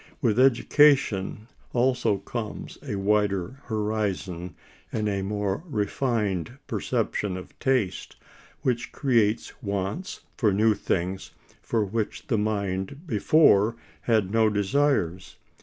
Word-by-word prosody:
With 110 Hz, +1 st, +1 dB
education 130 Hz, -5 st, +3 dB, 0.3 s
also 125 Hz, -4 st, +2 dB
comes 110 Hz, +2 st, -6 dB
a -, -, -4 dB
wider 105 Hz, +4 st, 0 dB
horizon 105 Hz, -6 st, -2 dB, 0.4 s
and 110 Hz, -1 st, -1 dB
a 100 Hz, -1 st, -1 dB
more 100 Hz, +4 st, -2 dB
refined 105 Hz, -, -1 dB
perception 95 Hz, -3 st, -1 dB
of 90 Hz, -, -11 dB
taste, 125 Hz, -9 st, 0 dB, 0.5 s
which 120 Hz, -2 st, -1 dB
creates 115 Hz, -2 st, +1 dB
wants 100 Hz, -, -3 dB, 0.2 s
for 115 Hz, -7 st, +3 dB
new 110 Hz, +3 st, +4 dB
things 95 Hz, -2 st, -2 dB, 0.3 s
for 110 Hz, -3 st, 0 dB
which 110 Hz, +2 st, -3 dB
the 115 Hz, -, 0 dB
mind 100 Hz, -, -2 dB
before 115 Hz, -, +4 dB, 0.3 s
had 110 Hz, -5 st, +1 dB
no 110 Hz, 0 st, +4 dB
desires. 100 Hz, -, 0 dB
105 Hz, 110 wpm, -26 LUFS, 100-120 Hz, 0.5 s, new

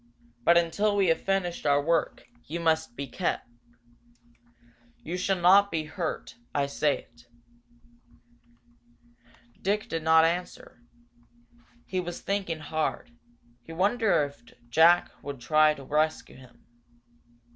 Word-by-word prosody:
But 170 Hz, +5 st, +5 dB
until 200 Hz, +5 st, +1 dB
we 195 Hz, -3 st, +2 dB
have 165 Hz, -, +1 dB
finished 195 Hz, -3 st, -1 dB
our 145 Hz, 0 st, +4 dB
work, 165 Hz, +3 st, -1 dB, 0.2 s
you 170 Hz, +3 st, -4 dB
must 160 Hz, -5 st, 0 dB
be 140 Hz, -, -4 dB
kept. 175 Hz, 0 st, -3 dB, 1.6 s
You 170 Hz, -, -4 dB
shall 190 Hz, +1 st, 0 dB
not 195 Hz, +3 st, +6 dB
be 160 Hz, -3 st, -2 dB
hurt 155 Hz, -7 st, -5 dB, 0.2 s
I 140 Hz, -1 st, +2 dB
say 140 Hz, +1 st, -1 dB
it." 120 Hz, +1 st, -24 dB, 2.3 s
Dick 205 Hz, +2 st, -1 dB
did 165 Hz, -, -3 dB
not 160 Hz, 0 st, +5 dB
answer. 175 Hz, -6 st, -4 dB, 1.0 s
He 185 Hz, -, -3 dB
was 175 Hz, -1 st, -5 dB
thinking 195 Hz, -4 st, -2 dB
hard. 155 Hz, +10 st, -3 dB, 0.5 s
He 165 Hz, -, -11 dB
wondered 200 Hz, 0 st, +2 dB
if 140 Hz, -4 st, -12 dB, 0.3 s
Jack 165 Hz, +5 st, +5 dB
would 140 Hz, -2 st, -7 dB
try 155 Hz, +4 st, +3 dB
to 140 Hz, -, -11 dB
rescue 155 Hz, +3 st, -1 dB
him. 130 Hz, -1 st, -18 dB
165 Hz, 125 wpm, -27 LUFS, 150-185 Hz, 2.3 s, not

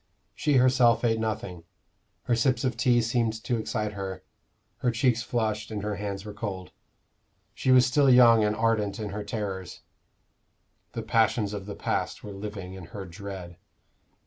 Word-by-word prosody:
She 150 Hz, -, 0 dB
herself 125 Hz, -2 st, +4 dB
ate 115 Hz, -2 st, +2 dB
nothing: 105 Hz, -6 st, -4 dB, 0.6 s
her 120 Hz, -, +1 dB
sips 120 Hz, +1 st, +1 dB
of 130 Hz, -2 st, 0 dB
tea 120 Hz, -2 st, +3 dB
seemed 115 Hz, -1 st, +1 dB
to 120 Hz, -, 0 dB
excite 105 Hz, -1 st, -2 dB
her; 95 Hz, -2 st, -6 dB, 0.5 s
her 125 Hz, -, 0 dB
cheeks 120 Hz, 0 st, +2 dB
flushed, 110 Hz, -3 st, -2 dB
and 105 Hz, -2 st, -4 dB
her 105 Hz, -1 st, -2 dB
hands 100 Hz, -1 st, -5 dB
were 105 Hz, -, -7 dB
cold. 100 Hz, -4 st, -5 dB, 0.8 s
She -, -, -2 dB
was 130 Hz, -1 st, +7 dB
still 135 Hz, +2 st, +3 dB
young 120 Hz, -3 st, +7 dB
and 105 Hz, 0 st, +1 dB
ardent 110 Hz, -3 st, 0 dB
in 105 Hz, -2 st, -4 dB
her 105 Hz, +1 st, -5 dB
terrors; 100 Hz, -3 st, -5 dB, 1.1 s
the 115 Hz, -, -4 dB
passions 110 Hz, -2 st, +1 dB
of 100 Hz, -1 st, -6 dB
the 100 Hz, -, -6 dB
past -, -, -2 dB
were 105 Hz, -, -7 dB
living 100 Hz, -2 st, -7 dB
in 95 Hz, -2 st, -9 dB
her 100 Hz, +3 st, -8 dB
dread. 90 Hz, -1 st, -8 dB
110 Hz, 165 wpm, -27 LUFS, 100-120 Hz, 1.1 s, was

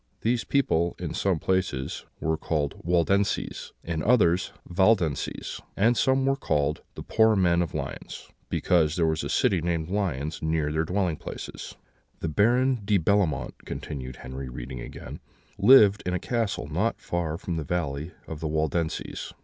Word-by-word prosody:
These 115 Hz, +1 st, +1 dB
people, 85 Hz, -, +1 dB
in -, -, -4 dB
some 95 Hz, -3 st, +1 dB
places, 90 Hz, -7 st, -1 dB
were 80 Hz, 0 st, 0 dB
called 75 Hz, -2 st, -1 dB
Waldenses; 90 Hz, +4 st, +1 dB
in 80 Hz, -2 st, -2 dB
others, 100 Hz, -5 st, +3 dB, 0.2 s
Valdenses; 90 Hz, -5 st, +1 dB, 0.2 s
and 115 Hz, +5 st, +4 dB
some 130 Hz, +4 st, +2 dB
were 135 Hz, 0 st, +3 dB
called 75 Hz, -, 0 dB
The -, -, -7 dB
poor 110 Hz, -1 st, +4 dB
Men 90 Hz, -3 st, +3 dB
of 85 Hz, -, -3 dB
Lyons, -, -, -6 dB, 0.2 s
because 80 Hz, -3 st, +2 dB
there 85 Hz, -, +2 dB
was 80 Hz, -1 st, 0 dB
a -, -, -3 dB
city 90 Hz, -4 st, +2 dB
called 85 Hz, 0 st, -1 dB
Lyons 80 Hz, -7 st, -2 dB
near 80 Hz, -2 st, 0 dB
their 80 Hz, +1 st, 0 dB
dwelling 90 Hz, -2 st, 0 dB
places." -, -, -7 dB, 0.4 s
"The 80 Hz, -, -2 dB
Baron 120 Hz, -, +3 dB
de 100 Hz, 0 st, +3 dB
Bellemont," 85 Hz, -5 st, +1 dB
continued 65 Hz, -4 st, -6 dB
Henry, 65 Hz, +1 st, -7 dB
reading 60 Hz, +1 st, -7 dB
again, -, -, -8 dB, 0.4 s
"lived 105 Hz, -3 st, +7 dB
in 90 Hz, 0 st, -1 dB
a -, -, -1 dB
castle 115 Hz, -4 st, -1 dB
not 90 Hz, +10 st, -1 dB
far 85 Hz, -2 st, -2 dB
from 85 Hz, -2 st, -4 dB
the 80 Hz, -, -2 dB
valley 75 Hz, -1 st, -2 dB
of 80 Hz, -, -7 dB
the 80 Hz, -, -2 dB
Waldenses. 80 Hz, +1 st, -2 dB
85 Hz, 155 wpm, -26 LUFS, 75-100 Hz, 0.4 s, lived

